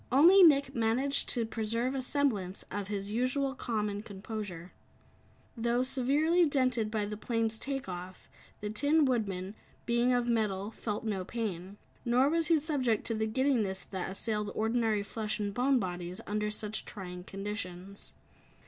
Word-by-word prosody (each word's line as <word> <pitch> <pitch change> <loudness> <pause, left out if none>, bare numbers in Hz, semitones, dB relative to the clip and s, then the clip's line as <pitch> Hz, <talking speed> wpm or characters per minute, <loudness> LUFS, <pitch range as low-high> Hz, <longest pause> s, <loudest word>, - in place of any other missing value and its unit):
Only 340 +9 +8
Nick 280 -5 +6
managed 245 +4 +1
to 235 -3 +1
preserve 230 +3 -1
a 270 - -1
semblance 245 -9 0
of 205 -1 -3
his 200 -1 -3
usual 260 +4 +1
calm 225 -5 -1
and 205 0 -4
composure. 200 -4 -6 0.8
Though 235 +1 +1
severely 285 +7 +3
dented 255 -6 +1
by 215 -1 -1
the 210 0 -5
plane's 225 0 -1
take 270 -3 -3
off, 180 0 -7 0.3
the 210 0 -3
Tin 290 +7 +3
Woodman, 200 -7 -1 0.3
being 240 +1 +3
of 245 -1 +2
metal, 210 -3 0
felt 210 -1 -4
no 200 -4 -1
pain. 195 -3 -4 0.3
Nor 250 +3 +4
was 330 0 +1
he 330 -2 +4
subject 275 -8 0
to 230 - 0
the 220 0 0
giddiness 220 -6 +1
that 190 -2 -3
assailed 210 +1 -2
ordinary 220 -2 +1
flesh 215 +1 -3
and 205 -1 -2
bone 260 +4 +3
bodies 180 -3 -3
under 210 0 -1
such 210 0 -2
trying 180 -3 -7
conditions. 195 -1 -6
220 Hz, 155 wpm, -31 LUFS, 205-255 Hz, 0.8 s, Only